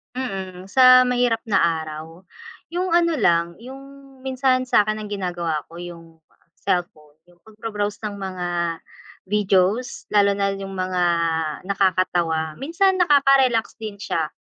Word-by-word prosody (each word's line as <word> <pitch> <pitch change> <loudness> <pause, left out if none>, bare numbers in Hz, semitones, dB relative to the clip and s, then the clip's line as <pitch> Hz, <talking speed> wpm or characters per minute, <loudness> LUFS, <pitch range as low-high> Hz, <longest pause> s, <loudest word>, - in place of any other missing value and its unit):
Mm, 190 -7 -5
sa 255 +2 +7
mahirap 245 -2 +1
na 205 - +2 0.2
araw, 160 +2 -9 0.5
yung 355 +1 -2
ano 335 -1 +3
lang 170 - +1
yung 260 +3 -11 0.4
minsan 260 -1 0
sa'kin 215 -1 +2
ang 210 - -7
ginagawa 175 -6 -3
ko 170 - -9
yung 165 -2 -11 0.4
cellphone, 155 -5 -3
yung 175 -1 -25
pagbro-browse 210 -1 -5
ng 205 -1 -5
mga 185 -2 -4 0.8
videos, 205 +3 0
lalo 200 -1 +4
na 200 0 0
yung 195 0 -7
mga 185 -1 -1 0.6
nakakatawa, 180 -5 0
minsan 370 +6 +1
nakaka-relax 275 -7 +4
din 215 -2 -6
siya, 165 -6 -2
200 Hz, 125 wpm, -22 LUFS, 175-250 Hz, 0.8 s, sa